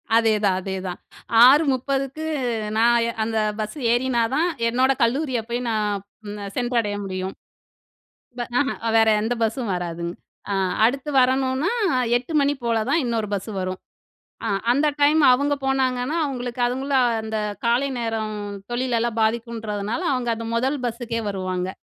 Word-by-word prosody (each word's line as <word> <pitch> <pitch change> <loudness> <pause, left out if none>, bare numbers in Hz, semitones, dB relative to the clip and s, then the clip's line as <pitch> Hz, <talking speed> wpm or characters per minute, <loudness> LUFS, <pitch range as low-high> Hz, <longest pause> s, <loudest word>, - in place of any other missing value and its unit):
அதேதான்! 215 -4 +3
அதேதான்! 190 -1 -5 0.5
6:30AMக்கு 275 +1 +2 0.5
நான் 235 +2 +5 0.3
அந்த 225 0 -2 0.2
பஸ் 215 +7 -4
ஏறினா 240 0 +1
தான், 330 +4 +2 0.2
என்னோட 255 +3 +3
கல்லூரிய 260 +1 +1
போய் 240 +1 -1
நான் 210 -3 -1 0.5
சென்றடைய 240 -4 0
முடியும். 190 0 -4 1.1
ப - - -3 0.2
ஆஹா. 270 -3 0 0.2
வேற 225 0 +5
எந்த 225 +3 0
பஸ்ஸும் 225 -1 -1
வராதுங்க. 170 -1 -4 0.4
ஆ. - - +1 0.3
அடுத்து 270 +5 +1
வரணும்ன்னா 260 +5 +2 0.5
8:00AM 285 +2 +1
போல 230 -1 +1
தான் 330 - +3
இன்னொரு 230 -3 -1
பஸ்ஸு 200 +2 -4
வரும். 185 0 -3 0.7
ஆ. - - 0 0.2
அந்த 285 +4 +2
டைம் 295 +2 +5
அவுங்க 285 +3 +2
போனாங்கன்னா 260 +2 0
அவுங்களுக்கு 250 -3 -4
அவுங்களும் 260 0 +1
அந்த 220 0 -4 0.3
காலை 245 +4 +2
நேரம் 225 -2 -2 0.4
தொழிலெல்லாம் 240 -2 0
பாதிக்குன்றதுனால, 220 +1 -2
அவுங்க 250 -2 -1
அந்த 230 0 -6
மொதல் 265 +5 0
பஸ்ஸுக்கே 230 -1 -3
வருவாங்க. 185 -2 -2
235 Hz, 125 wpm, -23 LUFS, 220-265 Hz, 1.1 s, நான்